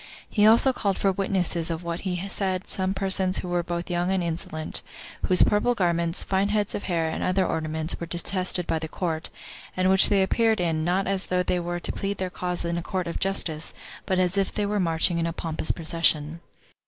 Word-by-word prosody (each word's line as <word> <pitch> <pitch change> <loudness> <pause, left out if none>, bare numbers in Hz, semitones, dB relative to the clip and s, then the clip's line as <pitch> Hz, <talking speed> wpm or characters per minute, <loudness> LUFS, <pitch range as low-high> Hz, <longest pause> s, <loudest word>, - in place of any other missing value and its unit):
He 210 -1 +3
also 235 +4 +6
called 200 -5 -1
for 195 - +2
witnesses 185 -3 0
of 165 +1 -4
what 170 0 -4
he 185 0 -3
said 190 -2 -2
some 190 0 +1
persons 190 -1 +2
who - - -4
were 175 0 0
both 175 0 -4
young 175 +1 0
and 190 -2 0
insolent; 160 -1 -3 0.5
whose 185 - +6
purple 240 +4 +2
garments, 170 -3 0
fine 195 +1 0
heads 210 -1 0
of - - -4
hair, 165 -3 0
and 160 - -4
other 185 +1 +1
ornaments, 160 0 -2
were 170 - -5
detested 180 +1 -1
[by 160 - -1
the 160 - -5
court], 160 -1 -3 0.5
and 185 +1 +3
which 190 0 +8
they 195 -2 +3
appeared 225 +2 +2
in, 165 -3 0
not 180 +3 +1
as 195 0 -1
though 180 0 +1
they 180 0 0
were 175 0 -3
to - - 0
plead 200 0 -3
their 185 -1 -3
cause 180 -1 -2
in 170 0 -1
a - - -5
court 185 +1 -3
of 170 - -4
justice, 165 -5 -1 0.3
but 190 -2 +1
as 185 +2 +1
if 195 - 0
they 210 - -1
were 205 0 -1
marching 170 -1 +2
in 165 - 0
a 165 - -3
pompous 160 -1 -3
procession. 165 -1 +1
180 Hz, 215 wpm, -25 LUFS, 170-195 Hz, 0.5 s, which